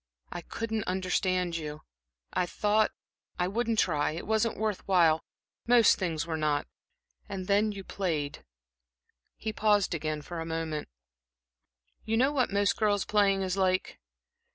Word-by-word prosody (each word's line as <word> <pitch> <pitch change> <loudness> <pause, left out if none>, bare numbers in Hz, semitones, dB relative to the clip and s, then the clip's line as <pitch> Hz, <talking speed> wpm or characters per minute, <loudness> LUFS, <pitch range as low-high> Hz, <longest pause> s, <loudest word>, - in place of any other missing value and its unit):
I 175 - -5
couldn't 225 +4 -3
understand 185 -1 0
you. 150 -1 -6 0.5
I 180 - +1
thought 210 +3 +2 0.5
I 180 - +1
wouldn't 230 +3 -1
try. 150 -6 +2
It 165 - -6
wasn't 220 +1 +1
worth 215 -2 -1
while 165 -4 +4 0.4
most 235 -3 +6
things 165 -4 -1
were 165 -1 -2
not. 150 -1 +1 0.6
And 190 -2 -4
then 205 +2 +2
you 200 -1 -7
played" 155 -8 -3 0.9
He 220 0 -4
paused 210 -4 +2
again 155 -2 -3
for 175 +1 -6
a - - -2
moment. 160 -2 -3 1.2
"You 225 +1 0
know 265 +4 +4
what 260 -7 +1
most 200 0 +2
girls' 205 -3 +2
playing 200 -2 +3
is 185 0 -2
like. 185 -1 0
190 Hz, 145 wpm, -29 LUFS, 165-215 Hz, 1.2 s, most